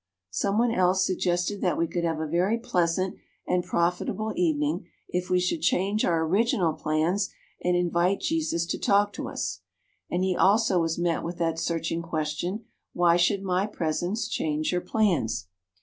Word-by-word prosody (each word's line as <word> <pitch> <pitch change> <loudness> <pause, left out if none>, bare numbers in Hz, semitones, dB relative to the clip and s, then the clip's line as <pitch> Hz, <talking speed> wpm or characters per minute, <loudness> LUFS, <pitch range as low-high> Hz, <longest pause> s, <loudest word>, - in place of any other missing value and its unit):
Some 195 - 0
one 235 +1 +3
else 185 -2 +3
suggested 180 +1 0
that 180 -5 +1
we 170 - +2
could 170 +1 -3
have 165 -2 0
a 160 - -1
very 180 +8 +1
pleasant 185 -6 0 0.3
and 180 0 +1
profitable 180 +5 -1
evening 305 - 0 0.2
if 180 0 -3
we 180 - +3
should 180 - -1
change 200 0 +1
our 165 -2 +2
original 185 -2 +2
plans, 160 +7 0 0.3
and 180 0 +2
invite 175 +2 +1
Jesus 310 - 0
to 170 - -3
talk 205 0 +3
to - - -5
us. - - -3 0.5
And 180 +1 0
he 185 -1 +1
also 200 -1 +4
was 165 0 -1
met 170 -1 0
with 170 +1 -5
that 165 -1 0
searching 165 0 -1
question, 170 +6 -3 0.3
'Why 175 -1 +4
should 190 +3 +2
my 185 +1 +1
presence 175 +3 -2
change 155 0 -1
your 180 -1 0
plans?' 170 - 0
180 Hz, 165 wpm, -26 LUFS, 170-200 Hz, 0.5 s, also